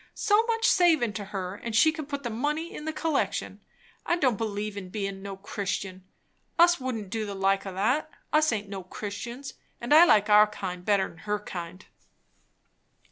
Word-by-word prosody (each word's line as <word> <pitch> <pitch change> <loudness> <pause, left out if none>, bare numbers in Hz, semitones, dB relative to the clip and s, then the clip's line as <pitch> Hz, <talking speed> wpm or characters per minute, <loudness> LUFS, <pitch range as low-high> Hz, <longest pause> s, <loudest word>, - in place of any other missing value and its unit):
So 420 0 +3
much 455 -1 0
savin' 320 - +4
to 205 -1 -5
her, 190 -2 -5
and 220 +2 -6
she 315 +8 +6
can 310 -3 -7
put 280 -1 -5
the 240 - -3
money 300 +8 -2
in 300 - -7
the 315 - -1
collection. 315 -2 -2 0.4
I 345 - +1
don't 265 -9 +2
believe 210 -1 -3
in 190 -2 -7
bein' 195 0 -4
no 195 -1 -7
Christian! 195 -1 -4 0.5
Us 345 -1 +5
wouldn't 225 -7 -4
do 225 -1 -2
the 200 - -5
like 195 +1 +1
o' 190 - -5
that, 250 +10 +1
and 310 - -26 0.2
us 310 -3 +2
aint 210 -2 -3
no 195 -1 -6
Christians; 235 +8 -7 0.3
and 240 +4 0
I 325 +3 +9
like 210 - +4
our 210 0 +7
kind 185 -4 -6
better 200 0 +3
'n - - -11
her 210 +4 -2
kind." 180 -2 -8
210 Hz, 190 wpm, -27 LUFS, 195-290 Hz, 0.5 s, I